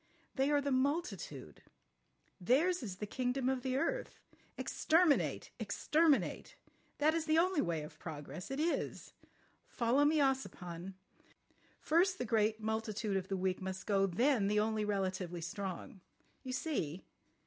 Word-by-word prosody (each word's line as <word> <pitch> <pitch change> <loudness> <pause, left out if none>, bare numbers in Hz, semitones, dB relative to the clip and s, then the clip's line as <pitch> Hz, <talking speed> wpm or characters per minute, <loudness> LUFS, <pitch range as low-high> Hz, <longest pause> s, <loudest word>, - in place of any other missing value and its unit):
They 270 +1 +1
are 290 -1 +3
the 280 0 -1
multitude. 285 +7 -2 0.8
Theirs 305 - +2
is 200 -7 -5
the 210 - -4
kingdom 250 +4 -1
of 265 -1 0
the 260 0 -1
earth. - - -2 0.4
Exterminate, 320 -2 +2
exterminate! 310 -2 +1 0.4
That 310 +2 +3
is 330 -1 -1
the 310 0 +3
only 360 -1 +3
way 165 -3 -1
of 150 - -11
progress. 160 +3 -7
It 270 +1 -3
is! 330 +2 -2 0.5
Follow 245 +4 +2
me, 305 +2 +4
Ossipon. 195 -10 -1 0.8
First 370 +4 +3
the 250 - -2
great 220 -1 +2
multitude 220 -1 -2
of 190 -1 -1
the 195 - -2
weak 185 0 -1
must 190 0 -5
go, 195 -2 +3
then 230 +3 +2
the 210 +1 +2
only 215 0 +1
relatively 190 -4 -2
strong. 190 +1 -5 0.4
You 255 - -5
see? 190 - -2
230 Hz, 140 wpm, -35 LUFS, 190-290 Hz, 0.8 s, me